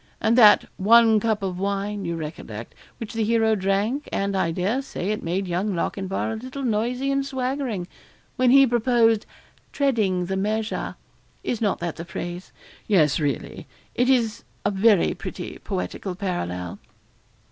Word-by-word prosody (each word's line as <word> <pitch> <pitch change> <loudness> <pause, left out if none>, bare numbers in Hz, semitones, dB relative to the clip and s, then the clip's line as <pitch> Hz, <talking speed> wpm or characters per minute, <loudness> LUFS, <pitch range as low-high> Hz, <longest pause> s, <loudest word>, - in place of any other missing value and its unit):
And 225 +1 +2
that 220 -4 +7
"one 225 +2 +6
cup 215 -1 0
of 185 -2 -3
wine" 200 0 -2
you 170 0 -2
recollect 150 -9 -7 0.2
which 225 -1 -7
the 225 -1 0
hero 225 0 +3
drank; 205 +8 0
and, 200 0 -1
I 190 -3 +1
dare 190 +10 0
say 205 -7 -4
it 215 - -2
made 185 +3 -2
young 185 +3 -1
Lochinvar 195 +4 -2
a - - -3
little 260 +4 -7
noisy 245 +4 0
and 275 0 +1
swaggering, 260 -7 -3 0.5
when 255 -2 +3
he 275 +2 +7
proposed 235 -2 +2 0.4
"treading 215 -11 +1
the 190 +2 -2
measure" 215 +3 -2 0.5
is 235 - -2
not 205 -3 +1
that 170 -2 -3
the 170 - -6
phrase? 175 +1 -6 0.4
Yes, 160 -9 +3
really; 145 -5 -3 0.3
it 245 +1 +1
is 235 -4 +1 0.2
a 205 - +2
very 200 -1 +4
pretty - - -7
poetical 90 - -4
parallel.' 90 - -4
210 Hz, 155 wpm, -24 LUFS, 185-235 Hz, 0.5 s, that